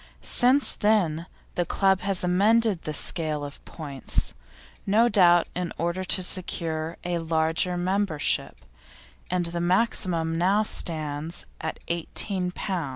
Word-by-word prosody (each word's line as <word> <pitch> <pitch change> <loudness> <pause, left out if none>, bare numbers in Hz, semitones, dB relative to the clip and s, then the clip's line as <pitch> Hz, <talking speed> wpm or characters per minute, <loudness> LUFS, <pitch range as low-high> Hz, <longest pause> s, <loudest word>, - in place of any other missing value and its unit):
Since 260 +3 +3
then 175 -6 0 0.3
the 175 - 0
club 190 +2 +1
has 195 -1 +2
amended 205 +2 +2
the 155 - -5
scale 155 -1 +2
of 145 - -9
points, 140 -5 -2 0.5
no 220 +4 +4
doubt 175 -5 +4
in 180 -2 -4
order 170 +2 -2
to 185 0 +2
secure 165 -3 -2
a 175 -1 -2
larger 165 +2 0
membership, 185 -3 -1 0.6
and 180 -1 -1
the 170 0 -3
maximum 175 -3 +1
now 195 +5 +2
stands 155 -4 -2 0.2
at 160 - -4
18 180 +2 -1
lb. 180 -4 -4
175 Hz, 125 wpm, -25 LUFS, 160-190 Hz, 0.6 s, no